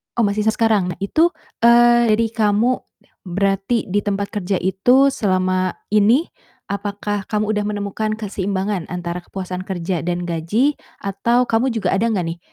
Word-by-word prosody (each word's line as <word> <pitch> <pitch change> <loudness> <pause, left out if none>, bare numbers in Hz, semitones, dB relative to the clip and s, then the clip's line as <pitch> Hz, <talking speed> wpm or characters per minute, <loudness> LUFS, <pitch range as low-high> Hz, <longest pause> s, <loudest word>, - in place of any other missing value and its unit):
Oh 235 - +2
masih 210 0 0
sekarang. 215 -5 +2
Nah - - -18
itu, 315 +12 +3 0.3
eee, 240 -1 +5
dari 230 +1 +1
kamu 225 +3 +2 0.5
berarti 195 +5 0
di 205 - +2
tempat 200 0 -2
kerja 200 -3 -2
itu 245 +10 +3
selama 185 -4 0 0.2
ini, 215 +8 +4 0.5
apakah 205 0 -3
kamu 215 0 0
udah 210 -1 -1
menemukan 210 +1 -2
keseimbangan 200 -3 -3
antara 175 0 -4
kepuasan 185 0 -6
kerja 175 -1 -2
dan 175 0 -2
gaji? 175 - 0 0.2
Atau 220 +5 +1
kamu 235 +3 +1
juga 225 - 0
ada 225 +4 +1
nggak 210 -6 0
nih 170 - -19
205 Hz, 150 wpm, -20 LUFS, 185-225 Hz, 0.5 s, eee